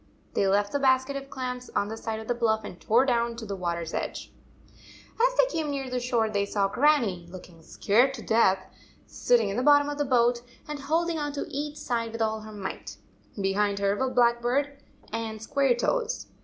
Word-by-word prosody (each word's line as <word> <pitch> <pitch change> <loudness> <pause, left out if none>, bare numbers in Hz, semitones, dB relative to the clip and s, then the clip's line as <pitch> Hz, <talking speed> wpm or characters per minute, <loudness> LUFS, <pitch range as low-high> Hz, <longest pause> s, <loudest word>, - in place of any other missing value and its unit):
They 195 - +2
left 205 +1 +2
the 285 - 0
basket 260 0 +2
of 275 0 -6
clams 250 -1 -5
on 200 - +1
the 220 - -4
side 225 0 -4
of 220 - -9
the 245 - +1
bluff 220 -2 +1
and 180 - -9
tore 240 +5 +3
down 235 -2 +1
to 230 -1 -7
th 200 -2 -5
water 170 -1 -2
s 165 -1 -6
edge. - - -4 0.9
As - - +3
the - - +7
boat - - -1
came 315 -2 -2
near 270 -2 -3
the 250 - 0
shore, 240 -2 +1
they 205 -2 0
saw 200 -1 +1
Grannie, 230 - +2
looking 175 -2 -12
scared 240 +11 +2
to 230 - -9
death, 195 -4 +3 0.4
sit 245 - +2
ting 220 -4 -1
in 200 - -3
the - - +1
bottom 290 +1 +5
of 290 0 -5
the 290 - +1
boat, 240 -2 +3 0.3
and 300 -1 -5
holding 325 +3 0
on 290 -1 -3
to 285 - -3
each 295 +2 -4
side 230 -2 -2
with 230 - -4
all 220 0 -1
her 215 0 -10
might. 190 - -7 0.4
Behind 200 +1 +1
her 200 0 +1
were 260 +5 0
Blackbird 250 +4 +1 0.3
and 225 -1 -3
Squaretoes! 280 - 0
235 Hz, 210 wpm, -27 LUFS, 210-275 Hz, 0.9 s, the